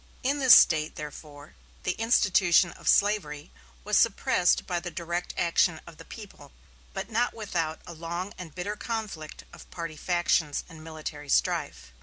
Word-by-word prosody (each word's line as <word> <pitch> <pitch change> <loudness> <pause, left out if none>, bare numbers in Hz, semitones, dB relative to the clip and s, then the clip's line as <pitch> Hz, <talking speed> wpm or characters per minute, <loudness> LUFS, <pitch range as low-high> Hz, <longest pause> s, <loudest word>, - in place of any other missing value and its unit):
In 280 +3 0
this 260 -3 +9
State, 155 -2 +3
therefore, 150 0 -10 0.3
the 180 - 0
institution 190 -5 +3
of - - -13
slavery 170 -8 +1 0.3
was 210 0 +2
suppressed 195 -4 +2
by 175 -1 -2
the 175 +1 -6
direct 170 +1 -4
action 170 -1 +2
of 170 -2 -13
the - - -13
people, 210 - -12 0.4
but 230 - -6
not 240 +3 0
without 170 -8 -3
a 175 - -9
long 170 +4 -5
and 170 -5 -10
bitter 200 +4 -4
conflict 210 -9 -6
of - - -14
party 165 -2 -6
factions 175 -3 0
and 160 -2 -13
military 155 -2 -8
strife. 65 - -1
175 Hz, 155 wpm, -27 LUFS, 155-205 Hz, 0.4 s, this